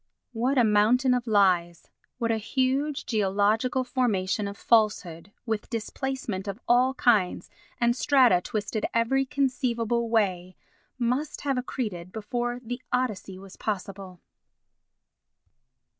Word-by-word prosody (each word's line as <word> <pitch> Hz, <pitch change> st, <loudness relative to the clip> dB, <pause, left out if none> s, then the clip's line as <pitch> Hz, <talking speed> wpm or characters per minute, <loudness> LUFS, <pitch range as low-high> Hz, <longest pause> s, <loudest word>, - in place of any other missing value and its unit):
What 250 Hz, +4 st, 0 dB
a 245 Hz, -, +5 dB
mountain 225 Hz, +5 st, +3 dB
of 250 Hz, -1 st, -1 dB
lies—what 195 Hz, +3 st, 0 dB
a 225 Hz, -, +1 dB
huge 270 Hz, +6 st, -1 dB
geological 215 Hz, +4 st, +1 dB
formation 215 Hz, -6 st, 0 dB
of 200 Hz, 0 st, -7 dB
falsehood, 200 Hz, -6 st, +1 dB
with 220 Hz, -3 st, -3 dB
displacement 230 Hz, -3 st, -4 dB
of 200 Hz, +2 st, -5 dB
all 250 Hz, +2 st, +3 dB
kinds, 210 Hz, -9 st, +1 dB, 0.3 s
and 235 Hz, 0 st, +2 dB
strata 250 Hz, -9 st, +4 dB
twisted 210 Hz, +2 st, -3 dB
every 270 Hz, +4 st, +2 dB
conceivable 240 Hz, -4 st, -1 dB
way, 185 Hz, -5 st, 0 dB, 0.4 s
must 255 Hz, +5 st, -1 dB
have 275 Hz, -2 st, -1 dB
accreted 205 Hz, -9 st, -5 dB
before 240 Hz, +3 st, -3 dB
the 245 Hz, +2 st, -5 dB
Odyssey 215 Hz, -7 st, -2 dB
was 195 Hz, 0 st, -12 dB
possible! 195 Hz, -3 st, -5 dB
225 Hz, 115 wpm, -26 LUFS, 200-250 Hz, 0.4 s, a